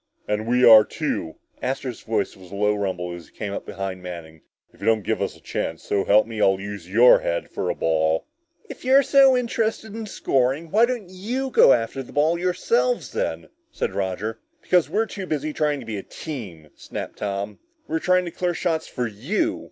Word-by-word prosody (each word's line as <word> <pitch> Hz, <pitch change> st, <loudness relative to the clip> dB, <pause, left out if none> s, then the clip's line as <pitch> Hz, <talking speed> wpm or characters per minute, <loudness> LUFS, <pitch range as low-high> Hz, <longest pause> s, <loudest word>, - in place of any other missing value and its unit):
"And 105 Hz, +1 st, -1 dB
we 125 Hz, +1 st, +4 dB
are 110 Hz, -2 st, +10 dB
too!" 80 Hz, -5 st, -3 dB, 0.3 s
Astro's 130 Hz, -2 st, -3 dB
voice 110 Hz, -3 st, -1 dB
was 95 Hz, -2 st, -15 dB
a -, -, -7 dB
low 105 Hz, +1 st, +2 dB
rumble 95 Hz, -4 st, -3 dB
as 85 Hz, -2 st, -10 dB
he -, -, -27 dB
came 105 Hz, -2 st, -4 dB
up -, -, -6 dB
behind 95 Hz, -1 st, -5 dB
Manning. 85 Hz, -3 st, -9 dB, 0.3 s
"If -, -, -22 dB
you -, -, -3 dB
don't 110 Hz, -2 st, +3 dB
give -, -, -1 dB
us -, -, -2 dB
a -, -, -20 dB
chance, 80 Hz, -, -4 dB
so 100 Hz, -1 st, 0 dB
help 105 Hz, +2 st, +5 dB
me, 115 Hz, -2 st, -5 dB
I'll 95 Hz, -1 st, +4 dB
use 100 Hz, -3 st, -7 dB
your 120 Hz, +5 st, +7 dB
head 85 Hz, -, -3 dB
for -, -, -2 dB
a -, -, -1 dB
ball!" 80 Hz, 0 st, +1 dB, 0.4 s
"If 280 Hz, -, -10 dB
you're 265 Hz, +2 st, +5 dB
so 270 Hz, -1 st, +6 dB
interested 225 Hz, -3 st, -1 dB
in 225 Hz, -1 st, -5 dB
scoring, 135 Hz, -2 st, 0 dB
why 225 Hz, +3 st, +5 dB
don't 240 Hz, -6 st, -3 dB
you 245 Hz, +8 st, -3 dB
go 175 Hz, -, +7 dB
after 115 Hz, +2 st, +1 dB
the 130 Hz, -, -12 dB
ball 155 Hz, +4 st, +2 dB
yourselves 470 Hz, -, 0 dB
then?" -, -, -3 dB, 0.2 s
said 95 Hz, -, -3 dB
Roger. 100 Hz, +3 st, -3 dB, 0.2 s
"Because 180 Hz, -3 st, +3 dB
we're 225 Hz, +1 st, +1 dB
too 195 Hz, -3 st, -7 dB
busy 155 Hz, -1 st, -2 dB
trying 150 Hz, -2 st, 0 dB
to -, -, -10 dB
be 110 Hz, -2 st, -4 dB
a -, -, -5 dB
team!" 95 Hz, -, -8 dB
snapped -, -, -7 dB
Tom. 100 Hz, +1 st, -3 dB, 0.3 s
"We're 160 Hz, -, -1 dB
trying 180 Hz, +1 st, +2 dB
to 170 Hz, -, -5 dB
clear 175 Hz, 0 st, -1 dB
shots 160 Hz, -2 st, -1 dB
for 125 Hz, -, -3 dB
you!" 200 Hz, -, -1 dB
125 Hz, 205 wpm, -23 LUFS, -, 0.4 s, are